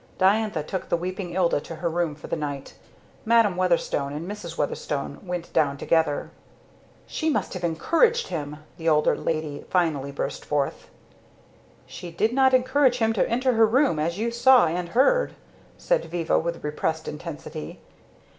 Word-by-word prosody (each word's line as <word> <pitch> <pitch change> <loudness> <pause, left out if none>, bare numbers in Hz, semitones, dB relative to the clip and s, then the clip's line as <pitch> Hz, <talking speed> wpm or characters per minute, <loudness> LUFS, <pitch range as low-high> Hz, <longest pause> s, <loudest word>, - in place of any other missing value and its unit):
Diantha 200 -3 +2
took 185 +4 -5
the - - +2
weeping 180 0 -5
Ilda 175 -5 +2
to 165 - -8
her 160 +2 -3
room 165 -2 -1
for 145 - -12
the - - -2
night. 145 -3 -5 0.5
Madam 230 -4 +4
Weatherstone 170 -6 0
and 155 +4 -5
Mrs. 190 -5 -7
Weatherstone 145 -1 -3
went 180 -2 -5
down 145 -3 +2
together. 160 0 0 0.7
"She 315 - -2
must 300 - -1
have 185 -2 -6
encouraged 335 - +2
him!" 150 -3 -4 0.2
the 165 0 +1
older 150 -1 +3
lady 155 -3 -3
finally 155 -6 0
burst 140 - -4
forth. 145 -2 -2 1.0
"She 180 - -9
did 215 +8 0
not 265 0 +5
encourage 255 0 +3
him 225 -2 +2
to 210 - +1
enter 250 +2 +1
her 225 -1 +5
room, 255 - +2
as 170 +3 -1
you 230 +2 -1
saw 250 -1 +6
and 170 +2 -2
heard," 390 - +3 0.4
said - - 0
Viva 165 -1 0
with 170 +1 -4
repressed 155 +2 -2
intensity. 155 0 -7
175 Hz, 160 wpm, -25 LUFS, 155-225 Hz, 1.0 s, saw